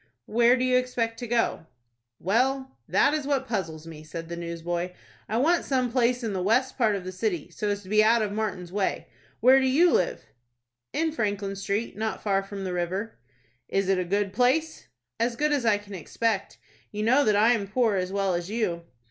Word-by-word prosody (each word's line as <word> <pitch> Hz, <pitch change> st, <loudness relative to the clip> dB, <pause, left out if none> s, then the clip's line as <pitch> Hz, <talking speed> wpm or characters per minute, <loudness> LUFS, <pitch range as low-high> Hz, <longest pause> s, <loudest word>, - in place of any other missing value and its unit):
"Where 240 Hz, +3 st, +4 dB
do 255 Hz, -, 0 dB
you 255 Hz, 0 st, +3 dB
expect 235 Hz, -3 st, -1 dB
to 240 Hz, -, -5 dB
go?" 230 Hz, -8 st, 0 dB, 0.5 s
"Well, 260 Hz, +7 st, 0 dB
that 285 Hz, -, +3 dB
is 300 Hz, -2 st, -2 dB
what 270 Hz, -2 st, 0 dB
puzzles 165 Hz, -9 st, -3 dB
me," 160 Hz, -2 st, -10 dB
said 165 Hz, +1 st, -7 dB
the 170 Hz, -, -4 dB
newsboy. 170 Hz, +1 st, -4 dB, 0.4 s
"I 220 Hz, -, 0 dB
want 330 Hz, +8 st, +3 dB
some 255 Hz, -3 st, 0 dB
place 245 Hz, 0 st, +1 dB
in 220 Hz, -3 st, -2 dB
the 185 Hz, -, -2 dB
west 245 Hz, +7 st, +2 dB
part 220 Hz, -5 st, +2 dB
of 195 Hz, -, -4 dB
the 185 Hz, -, -5 dB
city, 185 Hz, -3 st, -3 dB
so 205 Hz, +5 st, -3 dB
as 205 Hz, 0 st, -2 dB
to 185 Hz, -, -13 dB
be 215 Hz, +1 st, +5 dB
out 225 Hz, +1 st, +4 dB
of 205 Hz, -, -2 dB
Martin's 200 Hz, -5 st, -3 dB
way. 200 Hz, 0 st, -2 dB, 0.3 s
Where 260 Hz, +2 st, +7 dB
do 265 Hz, -, +1 dB
you 325 Hz, +7 st, +4 dB
live?" 180 Hz, -, 0 dB, 0.7 s
"In 325 Hz, 0 st, 0 dB
Franklin 205 Hz, -7 st, -2 dB
Street, 200 Hz, +3 st, -2 dB
not 220 Hz, +1 st, -3 dB
far 195 Hz, -2 st, +2 dB
from 195 Hz, 0 st, -7 dB
the 185 Hz, -1 st, -3 dB
river." 185 Hz, -, -3 dB, 0.5 s
"Is 195 Hz, -1 st, 0 dB
it 190 Hz, -1 st, +3 dB
a -, -, 0 dB
good 200 Hz, +2 st, -1 dB
place?" 265 Hz, +8 st, +1 dB, 0.3 s
"As 235 Hz, +1 st, 0 dB
good 300 Hz, +4 st, +1 dB
as 275 Hz, -5 st, +1 dB
I 210 Hz, -2 st, +4 dB
can 205 Hz, 0 st, -12 dB
expect. 200 Hz, +4 st, -2 dB, 0.3 s
You 210 Hz, 0 st, -3 dB
know 260 Hz, +6 st, +4 dB
that 215 Hz, -4 st, +3 dB
I 215 Hz, +3 st, +5 dB
am 205 Hz, -4 st, -2 dB
poor 220 Hz, 0 st, +1 dB
as 185 Hz, -1 st, -1 dB
well 195 Hz, -1 st, 0 dB
as 175 Hz, +1 st, -3 dB
you." 180 Hz, -7 st, -2 dB
215 Hz, 210 wpm, -26 LUFS, 190-245 Hz, 0.7 s, Where